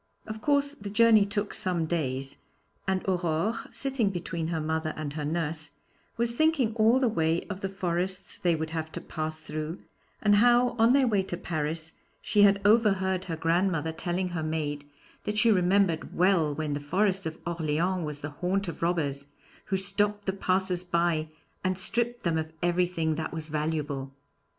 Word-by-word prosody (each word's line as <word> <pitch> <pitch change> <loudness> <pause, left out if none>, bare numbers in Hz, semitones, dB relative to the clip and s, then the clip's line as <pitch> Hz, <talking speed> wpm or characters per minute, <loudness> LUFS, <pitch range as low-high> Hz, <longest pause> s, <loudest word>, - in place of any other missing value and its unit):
Of 215 0 -7
course, 285 0 +2
the 205 -8 -8
journey 215 -1 +5
took 205 0 -2
some 175 -3 0
days, 135 -5 -2 0.5
and 190 0 -1
Aurore, 180 +2 +1 0.2
sitting 270 -6 +1
between 170 -3 -3
her 165 -1 -1
mother 160 0 -2
and 150 -2 -4
her 150 -1 -4
nurse, 160 0 -3 0.4
was 235 0 0
thinking 285 -5 +2
all 230 +3 +4
the 260 - +3
way 165 -5 +1
of 195 0 -6
the 195 - -2
forests 185 0 -3
they 175 -2 +2
would 160 0 -4
have 160 -1 -3
to - - -4
pass 155 0 -4
through, 155 +2 -5 0.4
and 205 -1 +4
how, 245 +2 +5
on 230 +2 +6
their 275 -1 +5
way 210 -5 +2
to 180 -2 -5
Paris, 160 -1 -3 0.3
she 210 - +2
had 200 -1 +6
overheard 195 -4 +3
her 165 - -3
grandmother 165 -1 +1
telling 175 +3 -2
her 175 -2 -3
maid 150 -2 -3 0.4
that 210 0 -2
she 230 +1 +5
remembered 185 -3 +2
well 180 -4 +3
when 155 -1 -2
the 145 - -2
Forest 190 +5 0
of 160 0 -6
Orleans 170 +2 0
was 150 -1 -5
the 145 - -5
haunt 185 +6 -1
of 170 - -6
robbers, 145 -5 -1 0.4
who 190 - 0
stopped 205 +2 0
the 190 - 0
passers 185 -2 +1
by 170 -3 +1 0.4
and 185 -1 0
stripped 240 +5 -2
them 165 -2 +1
of 160 0 -4
everything 175 -2 +1
that 160 - -3
was 160 -1 -5
valuable. 150 -3 -2
175 Hz, 175 wpm, -28 LUFS, 160-200 Hz, 0.5 s, on